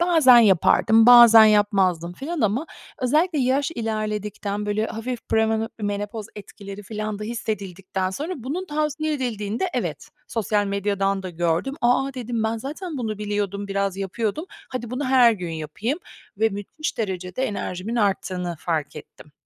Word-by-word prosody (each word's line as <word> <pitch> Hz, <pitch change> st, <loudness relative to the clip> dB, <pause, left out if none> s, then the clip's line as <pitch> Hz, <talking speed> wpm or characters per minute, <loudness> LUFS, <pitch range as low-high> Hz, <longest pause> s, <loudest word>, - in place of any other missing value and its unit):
bazen 320 Hz, -8 st, +6 dB
yapardım, 220 Hz, +2 st, +5 dB
bazen 235 Hz, -2 st, +9 dB
yapmazdım 195 Hz, -5 st, +2 dB
filan 300 Hz, -, -5 dB
ama 230 Hz, +8 st, 0 dB, 0.4 s
özellikle 305 Hz, +6 st, +2 dB
yaş 265 Hz, +2 st, +1 dB
ilerledikten, 210 Hz, -4 st, -3 dB
böyle, 210 Hz, +1 st, 0 dB
hafif 235 Hz, +2 st, -6 dB
premeno 220 Hz, 0 st, +1 dB
menopoz 205 Hz, +1 st, -3 dB
etkileri 200 Hz, -1 st, -9 dB
filan 215 Hz, +1 st, -5 dB
da 210 Hz, -, -5 dB
hissedildikten 195 Hz, -4 st, -4 dB
sonra 300 Hz, -, -4 dB
bunun 290 Hz, +9 st, -4 dB
tavsiye 305 Hz, 0 st, -1 dB
edildiğinde 235 Hz, -, -2 dB
evet, -, -, -3 dB, 0.2 s
sosyal 210 Hz, -2 st, 0 dB
medyadan 200 Hz, -1 st, -1 dB
da 185 Hz, -, -5 dB
gördüm. 175 Hz, +9 st, -1 dB
"A 245 Hz, +2 st, +3 dB
a!" 275 Hz, -, -7 dB
dedim. 240 Hz, -3 st, -3 dB
"Ben 220 Hz, +1 st, 0 dB
zaten 300 Hz, -, -6 dB
bunu 215 Hz, -4 st, -3 dB
biliyordum, 205 Hz, -1 st, -3 dB
biraz 195 Hz, -1 st, -1 dB
yapıyordum. 210 Hz, -, -3 dB, 0.2 s
Hadi 245 Hz, -3 st, -5 dB
bunu 255 Hz, +3 st, -3 dB
her 255 Hz, -3 st, +5 dB
gün 180 Hz, -5 st, -5 dB
yapayım." 165 Hz, -, -3 dB, 0.4 s
ve 220 Hz, +1 st, +3 dB
müthiş 205 Hz, +10 st, -5 dB
derecede 190 Hz, +1 st, -3 dB
enerjimin 205 Hz, 0 st, -4 dB
arttığını 185 Hz, -5 st, -1 dB
fark 155 Hz, -4 st, -2 dB
ettim. 150 Hz, 0 st, -13 dB
215 Hz, 145 wpm, -23 LUFS, 195-250 Hz, 0.4 s, bazen